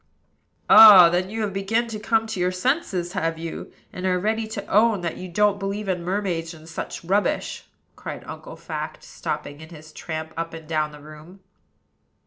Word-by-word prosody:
"Ah! 205 -6 +10
then 180 +2 0
you 220 +2 -4
have 205 -3 -2
begun 220 +5 0
to 215 -2 -5
come 225 +1 +1
to 220 -4 -5
your 180 +1 +1
senses, 185 - -1
have 165 -3 -1
you? 165 0 -7 0.2
and 185 +1 -3
are 180 -1 +2
ready 220 +3 -1
to 215 -2 -6
own 215 -1 +3
that 170 -2 -4
you 185 - -8
don't 205 +2 +2
believe 200 +1 -4
in 180 -2 -1
mermaids 175 -3 -2
and 160 0 -15
such 165 - -6
rubbish?" 195 +4 -1 0.3
cried - - -8
Uncle - - -9
Fact, - - -7
stopping 145 +1 -6
in 160 - -11
his 155 -2 -13
tramp 160 -1 -6
up 165 0 -4
and 160 -1 -11
down 155 -1 -1
the 150 0 -13
room. 155 +5 -14
185 Hz, 185 wpm, -23 LUFS, 165-210 Hz, 0.3 s, Ah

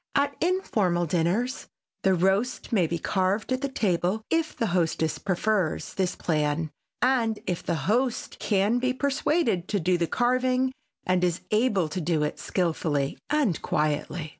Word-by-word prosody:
At 280 0 +2
informal 210 - +1
dinners 180 - 0 0.3
the 190 -1 +3
roast 195 +9 0
may 185 -6 +3
be 170 - -2
carved 190 +7 0
at 255 - -2
the 280 - -1
table 195 -3 0
if 330 -1 0
the 230 - +1
hostess 160 -3 0
prefers 190 -2 0
this 185 -2 -1
plan 155 -1 0 0.3
and 235 -4 +2
if 180 -2 -2
the 170 - -1
host 245 +4 0
can 205 +3 +2
be 255 +1 +1
persuaded 280 - 0
to 205 - 0
do 180 +1 +1
the 170 - +1
carving 255 +3 +1 0.3
and 185 -1 +2
is 175 -1 +1
able 215 -6 +2
to 185 +3 -3
do 160 -1 +1
it 150 - -3
skilfully 155 -6 -1
and 285 - +1
quietly. 150 +1 -1
190 Hz, 155 wpm, -26 LUFS, 170-250 Hz, 0.3 s, the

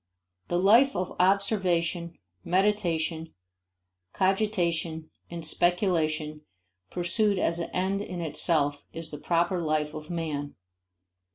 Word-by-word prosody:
The 175 - 0
life 230 +9 +5
of 180 - -3
observation, 180 -3 +1 0.3
meditation, 170 -4 0 0.8
cogitation, 175 -5 0 0.2
and 170 -1 -6
speculation 160 -3 0 0.5
pursued 200 +4 +1
as 170 -1 0
an 170 - -3
end 190 +2 -1
in 180 -3 -5
itself 150 -2 0
is 165 -1 -7
the 150 - -7
proper 175 +3 +1
life 155 -1 0
of 155 0 -8
man. 155 -4 -3
170 Hz, 105 wpm, -27 LUFS, 160-190 Hz, 0.8 s, life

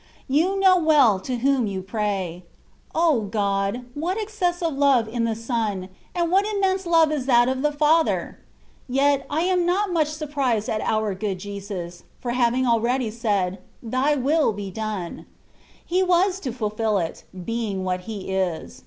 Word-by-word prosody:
You 335 +8 +2
know 380 -1 +6
well 295 - +4
to 250 +5 -3
whom 260 -1 +2
you 190 -2 -4
pray. 195 -4 -3 0.5
O 320 -7 +3
God! 200 +3 -1
what 345 +8 -2
excessive 355 -6 -1
love 275 -5 +3
in 230 +1 -1
the 225 -1 -1
Son! 220 -5 -2 0.3
and 340 -1 0
what 390 +2 +4
immense 390 -3 0
love 330 -2 +4
is 280 -4 -2
that 240 -2 +5
of 260 0 -1
the 300 +1 +2
Father! 310 +2 +1 0.5
Yet, 275 +2 +2
I 300 +2 0
am 360 0 +2
not 370 +2 +1
much 315 -3 +2
sur 305 0 -5
prised 260 -7 -1
at 215 - -1
our 215 -2 0
good 195 0 -3
Jesus, 195 -3 -7 0.2
for 245 - -3
having 250 +1 +2
already 235 0 +1
said, 205 -5 -1
" - - -35
Thy 255 +6 +1
will 290 -1 +2
be 200 -1 -6
done 210 -4 -5 0.3
!" - - -30
He 365 +2 +1
was 370 +1 +2
to 265 -9 -4
fulfil 215 -2 -1
it, 165 -3 -3 0.2
being 225 -5 -2
what 185 -1 -1
He 200 -3 -5
is. 185 -4 -2
245 Hz, 170 wpm, -23 LUFS, 210-315 Hz, 0.5 s, know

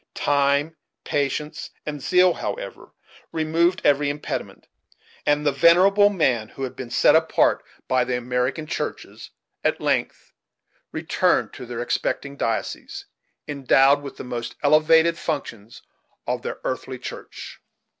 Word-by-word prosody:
Time, 145 +2 +1 0.3
patience, 150 +2 -2 0.2
and 150 -2 -5
zeal, 180 +4 +4
however, 100 -6 -6 0.4
removed 165 +3 +1
every 145 0 +3
impediment, 145 +1 -5 0.6
and 145 0 +2
the 145 - +4
venerable 185 +8 +5
men 130 - 0
who 135 - -8
had 130 - -4
been 130 -2 -7
set 120 - +4
apart 160 0 +2 0.2
by 130 -1 +2
the 125 0 -1
American 125 +5 -2
churches - - -5 0.3
at - - +1
length - - -2 0.6
returned - - 0
to 125 - -9
their 120 0 -4
expecting 140 +3 -2
dioceses, 115 -5 -3 0.4
endowed 140 0 +3
with 140 -1 -9
the - - -7
most 120 -2 -5
elevated 160 +3 +4
functions 115 -8 -5 0.4
of - - -2
their - - -5
earthly - - -4
church. - - -9
145 Hz, 125 wpm, -23 LUFS, 125-160 Hz, 0.6 s, venerable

